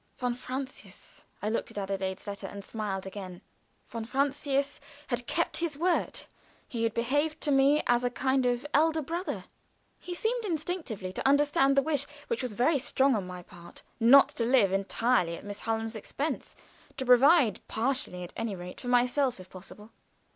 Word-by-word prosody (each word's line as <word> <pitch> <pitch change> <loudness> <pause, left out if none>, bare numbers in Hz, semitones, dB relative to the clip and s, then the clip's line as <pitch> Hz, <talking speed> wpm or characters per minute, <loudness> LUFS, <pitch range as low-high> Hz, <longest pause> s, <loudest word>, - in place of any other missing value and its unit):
Von 245 -1 -1
Francius 260 +2 -8 0.2
I 210 - 0
looked 230 - -2
at - - -11
Adelaide's 195 -1 -3
letter, 200 -1 -5
and 200 +1 -9
smiled 200 -4 -4
again. 190 -2 -8 0.4
Von 230 -1 -5
Francius 275 +2 -1 0.3
had 245 -1 -2
kept 335 - 0
his 330 -4 -2
word; 350 +3 0 0.5
he 235 -4 -4
had 225 - -1
behaved 290 +7 0
to 295 - +1
me 275 +2 +4
as 240 0 +3
a 245 - +2
kind 255 0 0
elder 315 +2 +3
brother. 340 +6 -3 0.6
He 355 -1 -6
seemed 465 +5 0
instinctively 310 - -3
to - - -1
understand 280 -1 +4
the 275 - +5
wish, 290 -2 +2 0.2
which 470 - -1
was 250 -4 -3
very 270 +7 +2
strong 270 0 +2
on 195 -4 -2
my 180 -1 -8
part, 175 0 -14 0.2
not 250 +4 +7
to 235 - -3
live 230 -6 +4
entirely 195 -2 +1
at - - -12
Miss 205 0 -6
Hallam's 225 0 -2
expense 275 +7 -4 0.4
to 265 - -2
provide, 255 - +5
partially 225 -7 -1
at 175 - -9
any 225 -3 -3
rate, 180 0 -9
for 250 - -7
myself, 250 0 +2
if 185 0 -13
possible. 210 +4 -11
245 Hz, 170 wpm, -29 LUFS, 205-285 Hz, 0.6 s, not